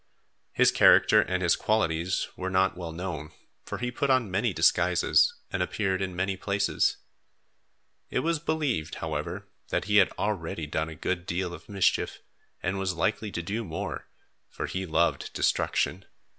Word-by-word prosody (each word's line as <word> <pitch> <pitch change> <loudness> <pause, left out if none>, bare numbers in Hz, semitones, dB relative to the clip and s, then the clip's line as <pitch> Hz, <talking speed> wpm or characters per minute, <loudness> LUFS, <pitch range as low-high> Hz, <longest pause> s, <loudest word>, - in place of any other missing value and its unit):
His - - +5
character - - +6
and 95 0 -1
his 85 - +4
qualities 90 -4 0
were 95 0 -3
not 95 0 +2
well 85 -2 -6
known, 80 -3 -5 0.3
for - - -5
he 125 0 -3
put 140 +3 -1
on 130 -6 +2
many 95 - +1
disguises 90 0 +3 0.2
and 95 - -1
appeared 95 +1 -1
in 95 -2 -3
many 95 +2 -1
places. 100 +2 0 1.1
It - - 0
was 165 -1 0
believed, 145 - -1
however, - - -4 0.2
that - - -1
he 105 0 +3
had 95 - +6
already 85 -6 -2
done 80 +2 -2
a 80 - -8
good 90 +2 -3
deal 90 0 -2
of - - -11
mischief 100 -2 +1 0.5
and 95 +2 -1
was 95 -1 -1
likely 100 +5 -1
to 85 - -4
do 105 +7 -3
more, 85 -5 -5 0.4
for - - -5
he 95 0 -4
loved 80 - +1
destruction. 95 +1 0
95 Hz, 160 wpm, -27 LUFS, 85-105 Hz, 1.1 s, character